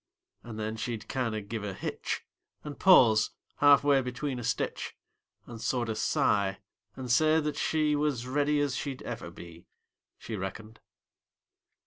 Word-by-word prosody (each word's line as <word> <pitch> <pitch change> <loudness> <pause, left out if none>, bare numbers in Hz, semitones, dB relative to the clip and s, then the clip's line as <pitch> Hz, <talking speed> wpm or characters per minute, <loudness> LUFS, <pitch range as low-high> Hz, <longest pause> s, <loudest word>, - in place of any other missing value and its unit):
And 110 -2 -8
then 110 +1 -3
she'd 115 -1 -4
kinder 115 -5 -2
give 105 +1 -5
a 100 -2 -4
hitch, - - -4 0.4
And 145 -2 -8
pause 115 - +6 0.3
half 145 -1 +6
way 140 -2 +4
between 125 +1 -4
a - - -6
stitch, - - -2 0.5
And 115 -2 -9
sorter 120 -3 -1
sigh, 100 -2 +1 0.4
and 130 -2 -4
say 155 +5 +4
that 150 -1 -2
she 155 -1 +1
Was 145 -5 0
ready 145 +3 +1
as 140 -3 0
she'd 135 -3 -4
ever - - -6
be, 85 0 -12 0.5
She 115 - -6
reckoned. 105 +3 -6
125 Hz, 145 wpm, -29 LUFS, 110-145 Hz, 0.5 s, pause